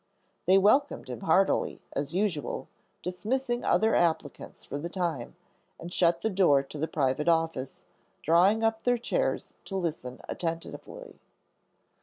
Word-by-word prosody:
They 190 +1 +7
welcomed 215 - +3
him 125 -3 -5
heartily, 190 +8 +2
as 140 0 -2
usual, 180 - -1 0.4
dismissing 240 +8 -2
other 220 +1 +3
applicants 160 -4 -1
for 145 - -5
the 170 +4 -4
time, 170 -9 -3 0.4
and 175 +1 -7
shut 170 -1 +3
the 220 - +1
door 175 -8 +4
to 145 +2 -9
the 160 - 0
private 140 0 0
office, 160 -5 0 0.4
drawing 185 +8 +4
up 225 0 +1
their 245 0 +2
chairs - - -1
to 195 - -4
listen 155 -8 -4
attentively. 170 - -6
175 Hz, 135 wpm, -28 LUFS, 150-210 Hz, 0.4 s, They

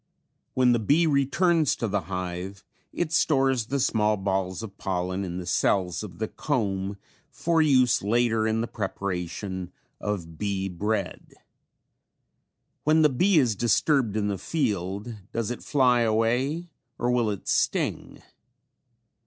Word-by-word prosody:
When 125 -1 +4
the 120 - +3
bee 145 +10 +3
returns 155 +2 +2
to 115 - -2
the 100 -1 0
hive, 90 +1 -5 0.3
it 170 -3 -2
stores 135 -7 +2
the 140 +2 -1
small 105 -4 +2
balls 95 -1 -2
of 100 -3 -8
pollen 95 +1 -2
in 90 -2 -4
the 90 - -5
cells 90 -1 +1
of 95 -5 -9
the 110 - -2
comb 100 -9 -2 0.3
for 165 -1 +1
use 130 -6 +4
later 115 +1 +2
in 110 +1 +1
the 115 - -2
preparation 95 -3 -4 0.3
of 85 -6 -4
bee 100 -2 -1
bread. 100 +2 -3 1.5
When 155 +1 +4
the 150 - +6
bee 180 +8 +3
is 125 -7 +3
disturbed 120 0 +2
in 105 -1 0
the 100 -2 -2
field 105 - -2
does 115 0 -2
it 120 - -5
fly 125 -4 +3
away 125 +9 0 0.3
or 120 +1 0
will 120 -3 +2
it 100 -2 -5
sting? - - -1
110 Hz, 140 wpm, -26 LUFS, 95-130 Hz, 1.5 s, the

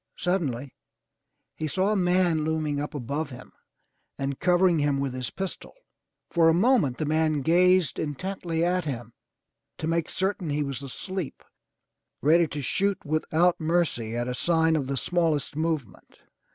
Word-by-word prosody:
Suddenly 140 -8 -1 0.8
he 155 - -3
saw 190 +6 +1
a - - +2
man 180 -4 +2
looming 155 -2 -1
up 145 +1 -4
above 145 +3 -3
him 125 -1 -11 0.6
and 135 0 -3
covering 180 -2 +3
him 145 -1 +1
with 135 -2 -2
his 130 -1 -3
pistol. 190 -1 -6 0.6
For 165 -2 +5
a 165 - +4
moment 190 - +3
the 155 - -1
man 155 -1 +1
gazed 180 +3 +3
intently 165 +2 -2
at 180 -1 0
him 120 -5 -5 0.6
to - - -4
make 165 0 0
certain 190 -3 -1
he 145 +1 0
was 140 -1 -4
asleep, 175 +4 -5 0.8
ready 165 +3 +4
to 145 0 -5
shoot 200 +8 0
without 160 +3 +2
mercy 155 -9 0
at 120 +1 -1
a 125 - -2
sign 160 +3 +2
of 140 -4 -1
the 135 0 -2
smallest 165 -3 0
movement. 155 - -3
160 Hz, 150 wpm, -26 LUFS, 140-175 Hz, 0.8 s, For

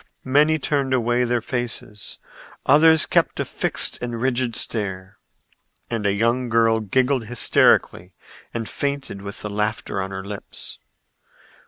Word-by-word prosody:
Many 150 +4 +3
turned 140 -2 0
away 120 0 +1
their 120 -1 0
faces; 120 -4 -3 0.5
others 160 +3 +6
kept - - +1
a - - 0
fixed - - -1
and 120 -1 -4
rigid 125 -1 0
stare, 95 -4 -3 0.7
and 110 -3 -1
a - - +3
young 115 +4 0
girl 115 0 +3
giggled 125 +4 +1
hysterically 95 -5 +2 0.4
and 115 -2 -4
fainted 140 -7 -4
with 100 0 -8
the 105 - -4
laughter 105 -1 -2
on 95 - -4
her 95 0 -6
lips. 100 0 -8
120 Hz, 135 wpm, -22 LUFS, 105-130 Hz, 0.7 s, others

